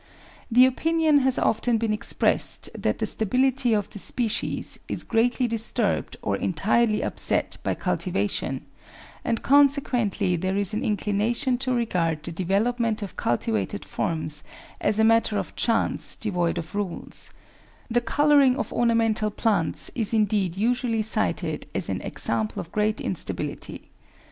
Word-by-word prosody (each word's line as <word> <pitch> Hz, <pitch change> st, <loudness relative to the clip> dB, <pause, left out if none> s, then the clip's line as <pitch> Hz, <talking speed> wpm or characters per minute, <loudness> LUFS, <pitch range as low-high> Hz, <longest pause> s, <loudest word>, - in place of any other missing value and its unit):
The 250 Hz, +2 st, +7 dB
opinion 315 Hz, +3 st, +2 dB
has 265 Hz, -1 st, +2 dB
often 230 Hz, +1 st, +1 dB
been 220 Hz, -1 st, 0 dB
ex 215 Hz, -, -1 dB
pressed -, -, +1 dB
that -, -, -1 dB
the -, -, -1 dB
stability 255 Hz, +3 st, +2 dB
of 205 Hz, -2 st, 0 dB
the 205 Hz, -, -8 dB
species 230 Hz, +2 st, -2 dB
is -, -, -3 dB
greatly 240 Hz, +2 st, +1 dB
disturbed 230 Hz, 0 st, -1 dB
or -, -, 0 dB
entirely 210 Hz, +5 st, +1 dB
upset -, -, 0 dB
by -, -, -1 dB
cultivation, -, -, -2 dB, 0.6 s
and 230 Hz, -, -1 dB
consequently 250 Hz, -9 st, +3 dB
there 185 Hz, +3 st, -1 dB
is 200 Hz, 0 st, 0 dB
an 215 Hz, -, -1 dB
inclina 210 Hz, +2 st, 0 dB
tion 255 Hz, -2 st, 0 dB
to 260 Hz, -1 st, -2 dB
regard 170 Hz, -10 st, -1 dB
the 170 Hz, -, -6 dB
development 215 Hz, +6 st, 0 dB
of 195 Hz, -, -7 dB
cultivated 110 Hz, -4 st, -1 dB
forms 155 Hz, -2 st, -3 dB, 0.4 s
as 205 Hz, 0 st, +1 dB
a 220 Hz, -, +4 dB
matter 225 Hz, -1 st, +3 dB
of -, -, -4 dB
chance 230 Hz, -1 st, +1 dB
devoid 180 Hz, -6 st, -1 dB
of 160 Hz, -1 st, -6 dB
rules; 200 Hz, -4 st, -2 dB, 0.6 s
the 240 Hz, 0 st, +1 dB
colouring 280 Hz, +1 st, +4 dB
of -, -, -3 dB
ornamental 225 Hz, -2 st, +2 dB
plants 205 Hz, -5 st, 0 dB
is 225 Hz, -1 st, 0 dB
indeed 200 Hz, -4 st, +1 dB
usually 230 Hz, 0 st, 0 dB
cited 220 Hz, -, -1 dB
as -, -, -1 dB
an -, -, -2 dB
example 215 Hz, -1 st, -2 dB
of 165 Hz, -, -7 dB
great 210 Hz, 0 st, 0 dB
instability. -, -, -4 dB
220 Hz, 145 wpm, -25 LUFS, 200-245 Hz, 0.6 s, The